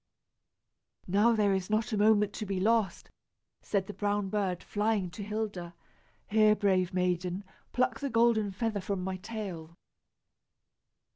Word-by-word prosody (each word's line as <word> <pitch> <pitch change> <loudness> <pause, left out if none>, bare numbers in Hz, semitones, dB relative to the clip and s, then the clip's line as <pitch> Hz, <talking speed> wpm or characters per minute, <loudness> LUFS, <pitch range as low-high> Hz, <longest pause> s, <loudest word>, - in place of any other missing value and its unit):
"Now 205 +5 +3
there 205 -2 +3
is 190 0 -2
not 215 +2 0
a - - +1
moment 210 -1 +4
to 215 - -4
be 195 -1 -1
lost," 215 -2 +1 0.5
said 195 -2 -1
the 205 - -7
brown 205 -1 -1
bird, 190 -3 -1
flying 205 -3 0
to 210 - -8
Hilda. 205 -5 -4 0.5
"Here, 215 0 +4
brave 190 -3 +1
maiden, 180 +1 -1 0.3
pluck 255 - 0
the 280 - -2
golden 230 -3 +3
feather 210 +1 -2
from 190 0 -3
my 190 0 -3
tail." 185 -6 -7
205 Hz, 140 wpm, -30 LUFS, 185-215 Hz, 0.5 s, moment